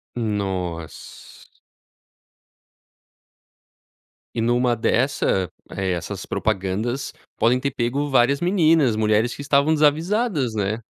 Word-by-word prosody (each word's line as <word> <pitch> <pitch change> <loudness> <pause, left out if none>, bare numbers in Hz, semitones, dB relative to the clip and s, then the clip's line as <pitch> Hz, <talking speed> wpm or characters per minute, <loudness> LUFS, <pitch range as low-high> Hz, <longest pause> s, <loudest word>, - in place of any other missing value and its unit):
Noss. 95 -7 -5 2.9
E 115 - -2
numa 120 +1 +2
dessa, 110 - +1 0.2
eh, 95 -1 -2
essas 90 +3 -4
propagandas, 110 +5 -2 0.2
podem 125 +2 +3
ter 140 +1 -2
pego 135 +5 -1
várias 135 +2 +3
meninas, 165 - +3
mulheres 110 +2 +1
que - - -8
estavam 140 +2 +3
desavisadas, 155 - +1
né 105 +1 -1
120 Hz, 95 wpm, -22 LUFS, 105-140 Hz, 2.9 s, podem